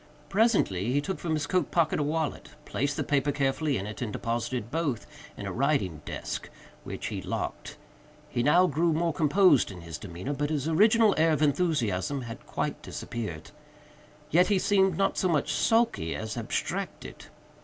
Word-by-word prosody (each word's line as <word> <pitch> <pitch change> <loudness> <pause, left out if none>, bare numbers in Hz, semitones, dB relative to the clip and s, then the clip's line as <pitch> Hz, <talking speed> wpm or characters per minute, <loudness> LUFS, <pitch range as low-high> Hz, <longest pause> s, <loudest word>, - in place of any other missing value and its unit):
Presently 195 - +2
he 140 - +2
took 165 +6 -3
from 160 -2 -1
his 150 -1 -1
coat 180 0 0
pocket 165 -3 +2
a - - +1
wallet, 155 +1 -2 0.2
placed 140 +2 -1
the - - 0
paper 145 0 +1
carefully 140 +1 0
in 95 - -4
it, 105 +3 -7
and 115 -4 -2
deposited 120 +1 -3
both 150 -6 -1 0.3
in - - -6
a - - -3
writing 130 - 0
desk, - - -5 0.3
which - - -6
he - - -4
locked. - - -4 0.5
He 120 - -1
now 170 +8 +5
grew 170 -1 +1
more 165 +1 +1
composed 155 0 +4
in 90 -3 -9
his 85 -2 -7
demeanor; 100 +7 -5
but 145 +1 -1
his 150 -2 -1
original 215 +5 +5
air 160 0 +4
of 155 - +1
enthusiasm 140 - +1
had 115 -1 -9
quite - - -3
disappeared. 105 -10 -6 0.8
Yet 180 +3 +5
he 205 - +3
seemed 190 -2 +3
not 195 - +1
so 185 - +2
much 150 -4 +1
sulky 225 - +2
as 110 -1 -4
abstracted. - - -4
145 Hz, 175 wpm, -28 LUFS, 120-170 Hz, 0.8 s, now